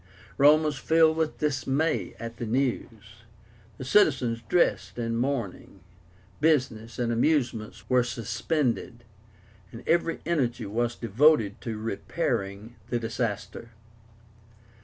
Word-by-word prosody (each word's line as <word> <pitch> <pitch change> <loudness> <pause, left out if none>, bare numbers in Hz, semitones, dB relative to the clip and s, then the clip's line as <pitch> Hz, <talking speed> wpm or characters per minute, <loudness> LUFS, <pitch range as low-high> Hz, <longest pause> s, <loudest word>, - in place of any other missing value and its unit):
Rome 150 +3 +6
was 150 -3 -2
filled 160 +1 +4
with 160 -1 -1
dismay 145 +2 -1
at 115 0 -7
the 120 - -4
news. 115 -4 -3 0.6
The - - -6
citizens 130 - +3
dressed 95 - +1
in 115 -1 -2
mourning, 115 -7 -3 0.6
business 125 -7 +1
and 120 -1 0
amusements 120 -4 0
were 125 -1 +4
suspended, 120 +1 -2 0.7
and 115 0 -11
every 165 0 +1
energy 135 -10 0
was 120 +4 -1
devoted 115 -2 +2
to 115 -2 -4
repairing 105 0 -3
the 120 - 0
disaster. 115 -1 -4
120 Hz, 110 wpm, -27 LUFS, 115-145 Hz, 0.7 s, Rome